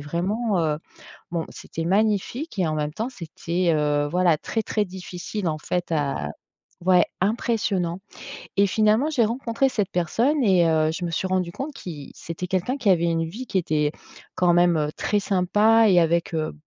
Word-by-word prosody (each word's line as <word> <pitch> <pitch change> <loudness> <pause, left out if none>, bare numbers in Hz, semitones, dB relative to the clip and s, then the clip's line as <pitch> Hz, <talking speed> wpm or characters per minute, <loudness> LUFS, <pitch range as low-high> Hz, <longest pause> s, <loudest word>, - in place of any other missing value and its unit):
vraiment, 190 +8 -1
heu, 155 -2 0 0.5
bon, 165 -2 -2
c'était 165 - -6
magnifique 210 - 0
et 175 - +2
en 155 - -1
même 150 0 -2
temps, 225 +7 -3
c'était, 170 -3 -2
heu, 150 -1 +1
voilà, 175 -2 +3
très, 225 +7 -3
très 215 - 0
difficile, 185 +1 -5
en 155 -1 -1
fait, 175 +2 -3
à 140 - -1 0.6
ouais, 180 -1 +5 0.2
impressionnant 195 -4 0 0.6
et 200 - +5
finalement, 215 +8 +2
j'ai 260 -7 +3
rencontré 240 +3 0
cette 210 -7 -1
personne 235 - +1
et 185 -6 +4
heu, 155 -1 +2
je 180 - -4
me 170 - -2
suis 165 - -1
rendue 185 -2 0
compte 280 - -5
qu'il 155 - -8
c'était 170 +2 -6
quelqu'un 190 +9 -1
qui 235 - 0
avait 170 -2 +3
une 165 -1 +1
vie 235 +10 -7
qui 195 - 0
était, 150 -4 0 0.4
quand 175 -1 +3
même, 170 -4 +3
très 210 - 0
sympa 210 +4 +3
et 180 -2 +6
avec, 170 0 +1
heu, 155 -1 -1
180 Hz, 175 wpm, -24 LUFS, 165-215 Hz, 0.6 s, et